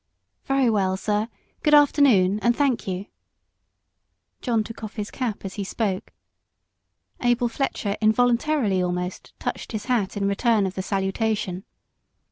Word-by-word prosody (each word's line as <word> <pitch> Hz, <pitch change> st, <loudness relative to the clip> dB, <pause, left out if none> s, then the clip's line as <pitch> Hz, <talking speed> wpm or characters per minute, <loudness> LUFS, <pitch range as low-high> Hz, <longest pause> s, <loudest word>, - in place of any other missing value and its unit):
"Very 270 Hz, -2 st, +2 dB
well, 195 Hz, -4 st, +1 dB
sir; 210 Hz, +2 st, 0 dB, 0.3 s
good 300 Hz, 0 st, +5 dB
afternoon, 255 Hz, -10 st, +5 dB
and 235 Hz, +2 st, +2 dB
thank 270 Hz, -6 st, +1 dB
you." 190 Hz, +1 st, -3 dB, 1.4 s
John 230 Hz, -4 st, +1 dB
took 225 Hz, +1 st, -10 dB
off 215 Hz, -, -6 dB
his 210 Hz, -2 st, -4 dB
cap 235 Hz, -6 st, -3 dB
as 190 Hz, -, -5 dB
he -, -, -1 dB
spoke 195 Hz, -1 st, -2 dB, 1.1 s
Abel 245 Hz, 0 st, +2 dB
Fletcher, 230 Hz, -5 st, -2 dB
involuntarily 235 Hz, -1 st, +2 dB
almost, 180 Hz, 0 st, -3 dB
touched -, -, -4 dB
his 215 Hz, -, -4 dB
hat 225 Hz, -6 st, 0 dB
in 200 Hz, -1 st, 0 dB
return 210 Hz, +1 st, +2 dB
of 190 Hz, -, -3 dB
the 190 Hz, -, -3 dB
salutation. 195 Hz, 0 st, -1 dB
215 Hz, 135 wpm, -24 LUFS, 195-245 Hz, 1.4 s, good